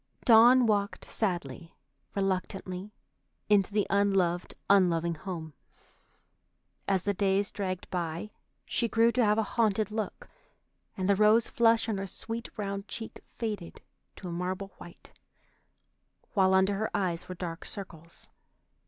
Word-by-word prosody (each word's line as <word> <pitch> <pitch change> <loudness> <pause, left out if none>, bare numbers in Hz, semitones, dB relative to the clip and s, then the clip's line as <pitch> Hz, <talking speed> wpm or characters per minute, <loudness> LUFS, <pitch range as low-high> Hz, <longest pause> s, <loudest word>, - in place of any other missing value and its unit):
Dawn 240 +2 +7
walked 205 -2 0
sadly, 170 - -3 0.4
reluctantly, 190 0 -2 0.6
into 205 -1 +4
the 205 -1 +1
unloved, 195 -3 +1
unloving 170 -4 +3
home. 160 -2 -7 1.3
As 190 -2 +1
the 205 - 0
days 195 +1 +1
dragged 185 -3 -4
by, 175 +3 -3 0.3
she 235 - 0
grew 230 +1 +3
to 250 0 +2
have 210 0 +3
a 220 - +2
haunted 215 -1 0
look, 220 - -4 0.7
and 185 -1 -1
the 200 - +4
rose 215 +3 +5
flush 230 -1 +3
on 210 -3 -1
her 195 - -4
sweet 225 +5 -5
round 200 -1 -4
cheek 225 +3 -7 0.2
faded 210 -7 -4 0.4
to 185 - -8
a - - -5
marble 185 +3 -3
white, 175 - -13 1.2
while 190 -2 +4
under 190 +1 +3
her 220 - -1
eyes 180 -4 -2
were 185 - -5
dark 170 -1 -6
circles. 170 -5 -10
195 Hz, 135 wpm, -29 LUFS, 180-215 Hz, 1.3 s, Dawn